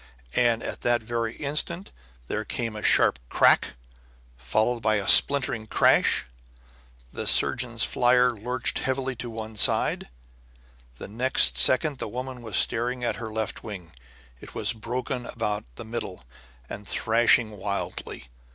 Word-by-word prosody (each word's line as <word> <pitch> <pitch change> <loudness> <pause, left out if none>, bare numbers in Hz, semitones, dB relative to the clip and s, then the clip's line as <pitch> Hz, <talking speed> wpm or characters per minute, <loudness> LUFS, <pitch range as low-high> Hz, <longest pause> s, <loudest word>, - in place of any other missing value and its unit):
And 120 -2 +1
at - - -6
that 120 -1 0
very 115 0 -3
instant 155 +6 -4 0.4
there - - -3
came 115 -2 -4
a 105 - -7
sharp 65 - +3
crack, - - +3 0.6
followed 110 - -1
by 110 -1 0
a 100 -2 -3
splintering 130 -6 +5
crash. - - +2 0.9
The - - -5
surgeon's - - +3
flier 125 0 +2
lurched 125 +4 -1
heavily 130 0 -3
to 120 - -6
one 110 -1 -8
side. 95 - +2 0.9
Next 125 +6 +2
second 140 +1 +3
the - - -4
woman 125 +2 -7
was 110 -3 -3
staring 120 +2 0
at 120 - -2
her 110 -2 -7
left 110 -1 -4
wing. 95 -7 -9 0.5
It - - -14
was - - +2
broken 125 +2 -5
about 105 -3 -4
the - - -9
middle 110 - -6 0.4
and 105 - -9
thrashing 115 0 +2
wildly. 100 - -6
115 Hz, 135 wpm, -25 LUFS, 110-125 Hz, 0.9 s, splintering